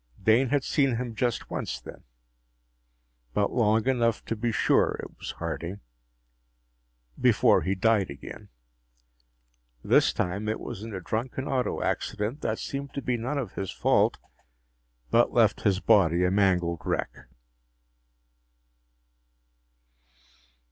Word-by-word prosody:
Dane 115 +6 +3
had 145 0 +1
seen 135 -4 +1
him 120 0 -4
just 120 0 -2
once - - -3
then - - -12 1.3
but 100 - +1
long 110 -1 +2
enough 120 -3 +1
to 115 - -2
be 115 +2 -1
sure - - +2
it - - -8
was - - -6
Harding 90 +5 -5 1.4
before - - +4
he 95 +1 -1
died 105 -1 +2
again. 70 - -10 1.3
This - - +4
time, 100 +4 -2
it 110 - -2
was 95 - -7
in 110 +1 -7
a 95 - -5
drunken 125 +7 -3
auto 130 -3 -1
accident 110 +6 -2
that 110 - -1
seemed 140 0 -6
to 140 - -2
be 125 - 0
none 125 +5 -3
of 120 -9 -4
his 95 -2 -4
fault, - - +2 0.9
but - - +3
left - - +3
his 95 -2 +2
body 90 -5 +4
a 90 - +2
mangled 90 -4 +1
wreck. - - -3
110 Hz, 125 wpm, -27 LUFS, 95-125 Hz, 1.4 s, before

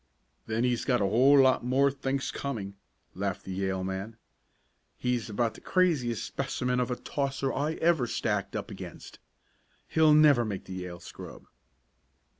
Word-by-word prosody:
"Then 110 +2 0
he's 125 -2 +1
got 125 -3 +2
a 100 - +1
whole 130 +8 +5
lot 130 -2 +4
more 135 +3 +3
thinks 135 0 -2
coming!" 110 -8 -4 0.4
laughed 95 0 -3
the 95 - -5
Yale 95 0 -2
man. 95 +4 -5 0.8
"He's 125 -2 -1
about 115 +2 0
the - - -14
craziest 150 - +1
specimen 125 -2 -2
of 125 0 0
a 125 - -1
tosser 135 -1 -2
I 150 +3 -1
ever 160 -7 +2
stacked 105 -4 -2
up - - -4
against. - - -9 0.7
He'll 155 -1 +5
never 150 -5 +6
make 105 -4 -4
the 95 - -8
Yale 90 -1 -6
scrub!" - - -10
125 Hz, 155 wpm, -29 LUFS, 100-140 Hz, 0.8 s, never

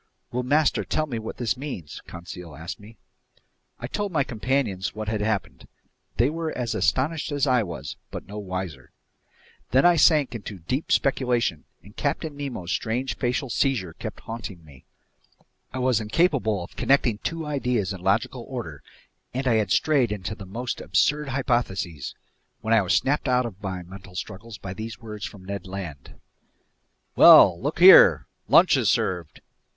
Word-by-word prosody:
"Will 125 - -1
master 145 +4 +2
tell 155 - -1
me 120 -6 -4
what 110 - -7
this 115 -6 0
means?" 125 - -7
Conseil 85 -1 -9
asked 80 0 -7
me. 105 +2 -15 0.8
I 120 - -5
told 205 +10 -3
my 155 -5 +2
companions 115 -6 -2
what 110 0 -5
had 105 -1 -1
happened. 100 -12 -2 0.5
They 120 - +4
were 165 0 -3
as 120 -2 -2
astonished 150 +4 0
as 145 -1 +1
I 125 -3 +3
was, 90 -5 -6
but - - -7
no 105 +1 -7
wiser. 90 -9 -6 0.8
Then 130 +5 +4
I 175 -1 +6
sank 150 -4 +4
into 105 -3 -7
deep 125 - -3
speculation, 120 - +1 0.2
and 100 +2 -16
Captain 150 +1 -2
Nemo's 130 -11 -5
strange 120 +3 -1
facial 125 0 -2
seizure 115 - 0
kept - - -8
haunting 105 -7 -8
me. 70 -4 -17 0.9
I - - -6
was 125 -3 +2
incapable 110 - +1
of - - -12
connecting 125 -6 +2
two 165 +4 -4
ideas 125 -9 -1
in 95 - -9
logical 95 +2 0
order, - - -6 0.5
and 130 +1 -1
I 115 -3 +4
had 105 -3 0
strayed 135 - +2
into 105 0 -4
the 100 -2 -10
most 120 +6 -4
absurd 145 - +1
hypotheses, 120 - -2 0.5
when 110 +1 0
I 115 - +6
was 95 -1 +1
snapped 145 +2 +1
out 125 -1 +2
of 105 -4 -8
my 95 -3 -4
mental 95 +1 -12
struggles 105 +3 -7
by 95 - -7
these 110 +3 -6
words 105 -3 -7
from 95 -2 -13
Ned 100 0 -5
Land: 90 -8 -8 1.0
"Well, 85 - +8
look 145 +4 -2
here! 185 +2 +8 0.2
Lunch - - +6
is - - +2
served!" 85 -4 -1
115 Hz, 165 wpm, -25 LUFS, 95-135 Hz, 1.0 s, Well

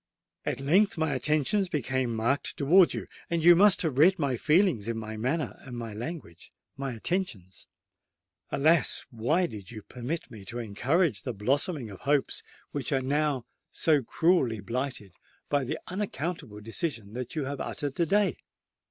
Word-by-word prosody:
At - - -1
length 175 +9 +3
my 160 -2 0
attentions 155 - +1
became 130 -5 -1
marked 120 +6 -1
towards 170 +6 +5
you,—and 170 -1 -4
you 175 0 +9
must 200 +2 +5
have 145 -5 -1
read 185 +5 +6
my 140 -5 0
feelings 150 - +2
in 115 -1 -2
my 110 0 -5
manner—my 120 -2 -3
language—and 115 - -7 0.3
my 135 -2 -4
attentions. 110 - -3 0.8
Alas! 155 0 +3
why 130 +10 +1
did 105 - -8
you 110 -3 -9
permit 130 +6 -5
me 110 -4 -10
to 120 +5 -6
encourage 120 - 0
the 125 - -4
blossoming 130 - 0
of 95 - -10
hopes 145 -1 0 0.3
which 145 0 -3
are 135 -2 +1
now 145 -2 0 0.3
so 155 -3 +3
cruelly 130 - +2
blighted 120 -1 -4 0.4
by 145 -1 +2
the 125 - -3
unaccountable 165 - -4
decision 115 - -4
that 125 +3 -5
you 150 -3 -1
have 140 0 -4
uttered 145 -2 -3
to 170 - +3
day?" 200 0 +2
140 Hz, 150 wpm, -28 LUFS, 115-165 Hz, 0.8 s, you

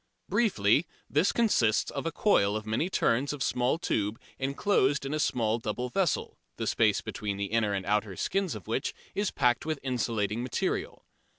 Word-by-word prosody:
Briefly, 155 - +2 0.2
this 150 +7 +3
consists 125 - +2
of - - -3
a - - -1
coil 105 - +3
of 110 0 -3
many 110 +11 0
turns 140 -4 +1
of 140 -3 -3
small 125 +5 +1
tube 110 - -1 0.2
enclosed 140 0 +1
in 135 - -3
a 155 - -1
small 115 -5 +1
double 125 +3 -3
vessel, 180 +4 -1 0.2
the - - -2
space - - +2
between 100 -2 -4
the 100 - -1
inner 110 -3 +1
and 95 -1 -3
outer 105 -1 0
skins 190 - -1
of 105 - -9
which - - -2 0.2
is 205 0 0
packed 125 -3 +2
with 155 -1 -2
insulating 115 -4 -1
material. 125 0 -2
125 Hz, 175 wpm, -29 LUFS, 105-155 Hz, 0.2 s, this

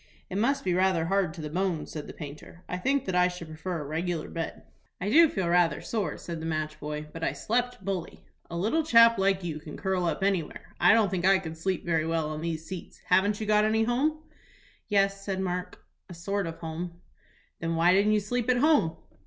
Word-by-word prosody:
"It 190 - -1
must 275 +5 +1
be 185 - +1
rather 185 -2 +2
hard 190 -1 +1
to 165 - -7
the 150 - -5
bones," 180 -2 -1
said 150 -2 -6
the - - -7
painter. 150 +3 -10
"I 180 - -3
think 270 +6 +1
that 190 - -2
I 180 0 +4
should 180 -2 -7
prefer 160 +2 -4
a - - -6
regular 165 +2 -2
bed." 165 -1 -5 0.4
"I 200 +3 -2
do 330 +4 +7
feel 190 -8 -2
rather 175 -1 +3
sore," 215 -5 -3
said 170 -2 -6
the - - -5
match 155 -1 -3
boy; 150 0 -5
"but 165 - -7
I - - +1
slept 245 -3 -2
bully." 190 -4 -4 0.2
"A 170 - -4
little 220 - +1
chap 230 -7 +6
like 195 -1 +2
you 160 -3 -4
can 150 0 -9
curl 190 -2 0
up 170 +3 -1
anywhere. 195 -5 -2
I - - +6
don't 215 -4 +3
think 180 -2 -1
I 195 0 +6
could 165 -4 -6
sleep 185 +3 -2
very 165 -2 +1
well 165 -2 -1
on 155 0 -5
these 165 -1 -3
seats. 185 0 -8
Haven't 200 +3 +3
you 220 - -3
got 210 0 +4
any 220 +1 +2
home?" 295 +7 0 0.6
"Yes," 195 -1 +1
said 195 -1 -3
Mark, 180 -1 -4 0.2
"a 175 - -8
sort 195 +2 -2
of 165 - -5
a - - -19
home." 170 +1 -6 0.6
"Then 165 0 -2
why 170 +2 +4
didn't 205 +3 +4
you 210 - +2
sleep 245 +4 -2
at 250 - +4
home?" 275 - +3
180 Hz, 225 wpm, -28 LUFS, 165-205 Hz, 0.6 s, do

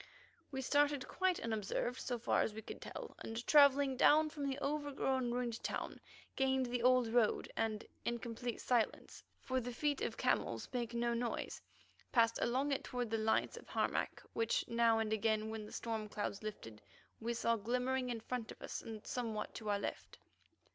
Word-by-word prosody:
We 265 -1 -3
started 290 0 +2
quite 375 -1 +1
unobserved, 225 +2 -1
so 245 - -2
far 230 - +2
as 210 - -1
we 220 - -6
could - - -8
tell, - - -7
and, 225 +2 -5
travelling 280 -2 +6
downward 305 +3 +6
from 285 -2 -2
the 270 - -2
overgrown, 280 -3 0
ruined 240 -1 -2
town, - - -3 0.4
gained 265 -1 +2
the 245 0 -1
old 250 -1 +5
road, 230 -2 +2
and 220 -1 -1 0.2
in 235 - 0
complete 235 0 -4
silence, 240 -3 0 0.2
for 260 -1 0
the 245 +1 -4
feet 290 +3 0
of - - -2
camels - - 0
make 235 -1 -2
no 235 0 +1
noise, 235 0 -2 0.5
passed 230 -2 +4
along 265 +4 +1
it 275 - 0
toward 245 -3 -3
the 225 - +2
lights 220 0 +1
of - - -11
Harmac, - - -1
which 225 0 +1
now 230 -1 +4
and 220 -1 0
again, 220 0 +1
when 220 -1 -5
the - - -12
storm 220 -2 -3
clouds 205 -1 -3
lifted, 115 - -7 0.4
we 235 +1 -2
saw 230 0 +2
glimmering 250 +4 0
in 235 -2 -3
front 240 -1 -4
of - - -11
us - - -4
and 220 -1 -8
somewhat 225 -4 -3
to 215 -2 -5
our 205 - +3
left. 200 - -5
235 Hz, 180 wpm, -37 LUFS, 225-260 Hz, 0.5 s, travelling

